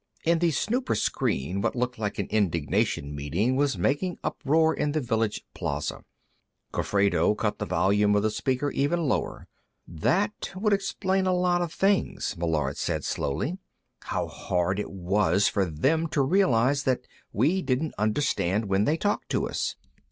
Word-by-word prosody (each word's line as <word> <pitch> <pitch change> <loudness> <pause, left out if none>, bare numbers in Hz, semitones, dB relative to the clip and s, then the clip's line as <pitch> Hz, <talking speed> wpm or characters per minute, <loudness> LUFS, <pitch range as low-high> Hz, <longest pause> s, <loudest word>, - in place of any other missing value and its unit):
In 165 0 +3
the 170 0 +3
snooper 240 - 0
screen, 90 +9 -1
what - - 0
looked 125 -1 -2
like 105 -2 -2
an 100 - -1
indignation 80 -7 0
meeting 85 - 0
was 140 0 +1
making 175 +6 0
uproar 160 +3 +2
in 145 - -1
the 155 - +1
village 115 -5 -1
plaza. - - -3 0.7
Gofredo 100 -1 +2
cut 105 -1 -1
the - - -3
volume 105 +1 +3
of 105 - +2
the 110 - +1
speaker 130 +5 -1
even 160 +3 0
lower. - - -2 0.4
"That 195 - -1
would 205 +2 +1
explain 195 -1 0
a 185 - +3
lot 180 -1 +2
of 175 -2 -2
things," 195 - 0
Meillard 80 -5 -1
said - - -2
slowly. 140 - -2 0.5
"How - - -1
hard 90 +2 -1
it - - -3
was 95 0 +2
for 100 -2 +1
them 135 - +1
to 145 -3 +1
realize 140 - +3
that 130 -1 0 0.3
we 155 - +2
didn't 135 +2 -1
understand 105 -3 +1
when 100 +1 +1
they 155 +6 +2
talked 205 +4 -1
to - - 0
us. - - -2
125 Hz, 160 wpm, -27 LUFS, 100-165 Hz, 0.7 s, In